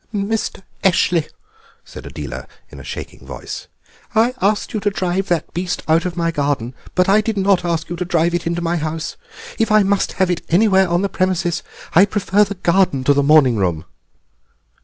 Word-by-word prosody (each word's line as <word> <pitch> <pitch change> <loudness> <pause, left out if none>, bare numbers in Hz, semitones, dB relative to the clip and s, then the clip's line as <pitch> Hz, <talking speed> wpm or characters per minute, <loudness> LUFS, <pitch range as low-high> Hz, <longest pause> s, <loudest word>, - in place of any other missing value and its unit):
"Mr. 210 -1 -2 0.2
Eshley," 170 -3 +2 0.6
said - - -10
Adela - - -7 0.2
in - - -11
a - - -10
shaking - - -8
voice, - - -8 0.5
"I 230 +3 +3
asked 205 +2 0
you 215 - -1
to 205 +1 +1
drive 190 0 -1
that 170 -4 -1
beast 175 +1 -3
out 160 +2 +3
of 180 0 -6
my 165 -1 +1
garden, 140 -5 -1 0.2
but 180 0 +3
I 205 +2 +5
did 215 -1 -3
not 195 -2 +2
ask 170 -2 -1
you 175 - -4
to 180 - -2
drive 170 -1 +1
it 175 -1 -1
into 170 0 -2
my 170 +1 0
house. 160 0 -4 0.4
If 225 -1 +1
I 215 -1 +6
must 195 0 0
have 185 -1 +1
it 175 - -2
anywhere 190 0 +4
on 175 +2 +1
the - - +2
premises 185 -3 -1 0.3
I 185 +5 +7
prefer 205 0 +2
the 205 0 -4
garden 175 -6 +1
to 145 - +4
the 140 - +2
morning 140 -5 +5
room." 85 -5 -1
175 Hz, 195 wpm, -19 LUFS, 165-195 Hz, 0.6 s, I